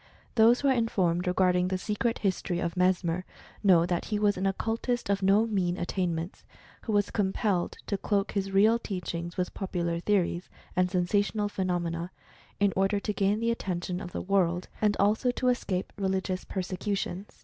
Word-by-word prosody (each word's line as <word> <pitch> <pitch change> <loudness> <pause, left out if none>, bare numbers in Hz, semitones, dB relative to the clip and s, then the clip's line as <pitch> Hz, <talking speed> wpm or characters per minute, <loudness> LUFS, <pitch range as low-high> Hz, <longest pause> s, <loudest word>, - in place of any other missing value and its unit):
Those 230 +1 +5
who 285 - +2
are 270 - +5
informed 185 -7 +1
regarding 180 0 +3
the 185 0 -1
secret 210 +4 -1
history 190 -3 -1
of 170 -1 -2
Mesmer 180 -1 +1 0.4
know 175 -4 +6
that 175 -1 -1
he 210 - -1
was 205 -1 +2
an 190 +1 0
occultist 225 +3 -1
of 200 0 0
no 200 +3 +4
mean 185 -5 0
attainments, 175 -2 -2 0.4
who 225 - -2
was 205 -1 +2
compelled 195 -2 0
to 200 - -2
cloak 200 -1 0
his 195 -1 -1
real 215 +4 +4
teachings 175 -4 -5
with 180 -1 -1
popular 170 -3 -2
theories 180 -2 0 0.3
and 180 0 +2
sensational 205 +3 +1
phenomena, 175 -3 -2 0.5
in 200 -2 +3
order 195 +2 +2
to 210 +1 -2
gain 200 +1 +1
the 230 +1 +1
attention 180 -4 -3
of 175 - -7
the - - -4
world, 180 -2 +1
and 210 -1 +2
also 215 +5 +3
to 250 +1 +1
escape 195 -7 -1
religious 190 -1 -1
persecutions. 190 +1 -4
195 Hz, 170 wpm, -28 LUFS, 180-205 Hz, 0.5 s, know